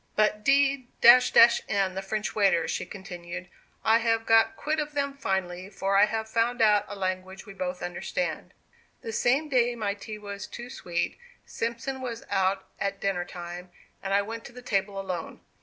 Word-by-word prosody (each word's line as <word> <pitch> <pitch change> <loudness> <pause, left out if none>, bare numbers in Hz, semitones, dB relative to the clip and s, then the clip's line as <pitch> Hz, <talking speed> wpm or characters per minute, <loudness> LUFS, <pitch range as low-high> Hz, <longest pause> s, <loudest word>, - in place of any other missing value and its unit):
"But 210 0 +2
d 275 -1 +3 0.2
n 240 +1 +11 0.8
the 190 +1 -4
French 210 +2 -3
waiters," 195 -6 +2
she - - -3
continued, 180 -2 -8 0.4
"I 225 +1 +5
have 225 -1 +1
got 225 +6 +4
quit 310 +1 -1
of 300 0 -3
them 280 -1 0
finally, 190 -6 -2
for 195 0 -1
I 200 +1 +7
have 220 +1 -3
found 230 +2 0
out 210 -2 +4
a 205 - -7
language 190 0 -4
we 200 - -10
both 180 -1 -4
understand. 180 - -3 0.5
"The 225 - -5
same 265 +8 +2
day 245 -4 +2
my 210 -3 -1
tea 215 +1 -8
was 200 -1 -7
too 240 +1 -8
sweet, 175 - -3 0.3
Simpson 235 +3 -4
was 235 -3 -5
out 190 0 +1
at 200 0 -2
dinner 185 -3 -1
time; 175 0 -8 0.3
and 195 - -4
I 200 +1 +3
went 225 +2 -6
to - - -9
the 250 +1 -12
table 195 -3 -1
alone. 185 -4 -5
205 Hz, 175 wpm, -27 LUFS, 190-235 Hz, 0.8 s, n